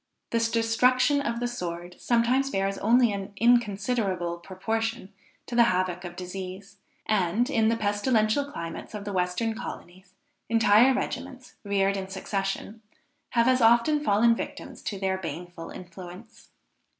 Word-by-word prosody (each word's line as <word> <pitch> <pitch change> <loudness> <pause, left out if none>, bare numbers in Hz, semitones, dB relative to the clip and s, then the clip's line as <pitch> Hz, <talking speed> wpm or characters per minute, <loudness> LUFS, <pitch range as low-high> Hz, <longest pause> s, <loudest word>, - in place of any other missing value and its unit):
The 230 - +2
destruction 235 +5 +3
of 235 -4 -2
the 240 - -1
sword 175 -6 -6
sometimes 245 +3 +2
bears 195 -3 -1
only 235 +1 +4
an 200 0 -6
inconsiderable 200 -6 +1
proportion 220 +3 -3 0.3
to - - -9
the 235 0 +6
havoc 185 -1 0
of 175 -1 -7
disease, 190 +2 -7 0.3
and, 210 +3 +1
in 225 -4 +3
the 230 - +1
pestilential 215 +5 +1
climates 165 +5 -7
of 205 -1 -6
the 205 - -4
western 180 +5 0
colonies, 185 -4 -9 0.3
entire 225 +3 +5
regiments, 255 0 -5
reared 200 -1 +1
in 190 -1 -4
succession, 195 +2 -4 0.6
have 235 +1 +5
as 255 0 +3
often 235 +7 +4
fallen 230 0 +4
victims - - -7
to 200 - -3
their 190 -1 -1
baneful 170 0 -7
influence. 180 +4 -11
205 Hz, 140 wpm, -27 LUFS, 185-235 Hz, 0.6 s, the